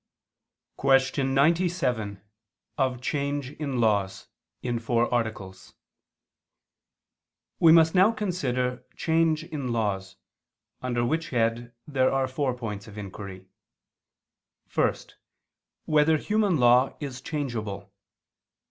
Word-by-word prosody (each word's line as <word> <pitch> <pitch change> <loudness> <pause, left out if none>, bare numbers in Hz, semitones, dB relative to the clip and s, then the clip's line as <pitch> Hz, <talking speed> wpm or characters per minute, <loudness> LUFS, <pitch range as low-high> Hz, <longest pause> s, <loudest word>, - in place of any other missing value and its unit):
________________________ - - -51
QUESTION 135 0 +2
97 135 - +1 0.6
OF 130 -2 0
CHANGE 140 0 -2
IN 140 -5 -4
LAWS 100 -4 0 0.3
(In 120 -2 -1
Four 120 +1 0
Articles) 110 -6 -4 1.8
We 165 - +7
must 160 -1 +6
now 190 +4 +5
consider 130 - -2
change 160 -1 +1
in 140 -6 -4
laws: 100 -4 -2 0.7
under 120 -2 -1
which 165 +6 -1
head 120 0 -1
there 130 -3 +2
are 135 -1 +1
four 130 -1 -1
points 105 -4 -6
of 110 -1 -12
inquiry: 95 -2 -8 1.3
(1) - - +2 0.9
Whether 155 +1 +4
human 210 0 +1
law 125 +1 +4
is 135 -3 -6
changeable? 120 - -4
130 Hz, 105 wpm, -26 LUFS, 115-150 Hz, 1.8 s, We